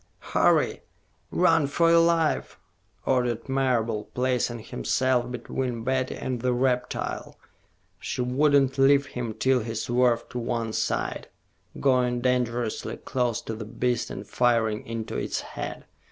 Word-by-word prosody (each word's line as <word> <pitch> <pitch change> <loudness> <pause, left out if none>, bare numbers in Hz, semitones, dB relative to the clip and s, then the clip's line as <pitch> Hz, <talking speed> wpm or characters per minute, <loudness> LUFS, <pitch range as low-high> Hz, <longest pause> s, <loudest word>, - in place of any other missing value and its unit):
"Hurry! - - +3 0.5
Run 165 -4 +3
for 165 +4 +3
your 170 - +7
life!" 165 -2 +1 0.5
ordered 125 -2 0
Marable, 120 -5 0
placing 125 -1 0
himself 125 +2 0
between 125 -1 -3
Betty 130 +1 0
and 125 -2 -3
the 125 0 +1
reptile. 125 0 -1 0.6
She - - -3
would 140 +4 +2
not 135 -1 +3
leave 140 +1 +5
him 120 -5 -5
till 130 -1 +2
he 115 0 -5
swerved 120 +1 +1
to 125 - -3
one 115 -2 -2
side, - - -2 0.5
going 125 -2 +2
dangerously 120 -2 -1
close 125 -3 -1
to 115 - -4
the 110 0 -6
beast 120 +2 -1
and - - -7
firing 115 -3 +1
into 115 -1 -4
its - - -2
head. - - -7
125 Hz, 135 wpm, -26 LUFS, 115-130 Hz, 0.6 s, your